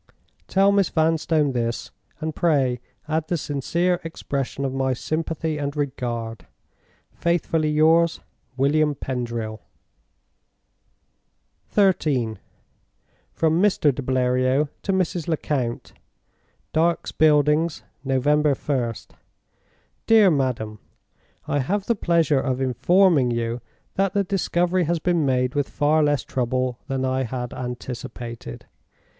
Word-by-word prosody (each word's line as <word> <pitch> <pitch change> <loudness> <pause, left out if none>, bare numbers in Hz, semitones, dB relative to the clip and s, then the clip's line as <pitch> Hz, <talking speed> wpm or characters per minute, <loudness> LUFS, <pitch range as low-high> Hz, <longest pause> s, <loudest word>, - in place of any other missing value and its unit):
Tell 195 +1 +4
Miss 200 -3 +3
Vanstone 160 -2 +2
this, 120 -2 -2 0.3
and 155 0 -4
pray 135 -7 +2 0.3
add 160 0 -1
the 175 - 0
sincere 170 +5 0
expression 140 -4 -4
of 130 - -2
my 135 -1 0
sympathy 155 +3 -2
and 140 0 -3
regard. 120 - -3 0.6
"Faithfully 165 -2 0
yours, 160 +2 +3 0.4
"WILLIAM 145 +2 +2
PENDRIL." 120 -4 -4 2.1
XIII. 150 - +2 0.9
From 160 +1 +1
Mr. 185 -8 +3
de 140 - -5
Bleriot 130 +2 +1
to 195 - -1
Mrs. 180 -3 -1
Lecount. 140 -7 -2 0.8
"Dark's 165 +2 +1
Buildings. 150 +1 +3 0.2
November 145 +2 +2
1st. 125 -5 -3 0.9
"DEAR 220 -4 +6
MADAM, 120 -7 -1 0.7
"I 145 - +1
have 195 +9 -1
the 235 - +2
pleasure 165 -8 +2
of 130 -2 -1
informing 145 +2 +3
you 115 0 -2 0.4
that 195 -1 +1
the 200 - +3
discovery 180 -2 0
has 170 +2 +1
been 165 -2 +1
made 125 -1 +1
with 145 -2 -1
far 150 +2 +2
less 145 -3 +2
trouble 130 0 -1
than 135 -2 -1
I 130 0 0
had 125 -1 -4
anticipated. 125 - -7
145 Hz, 110 wpm, -23 LUFS, 130-165 Hz, 2.1 s, DEAR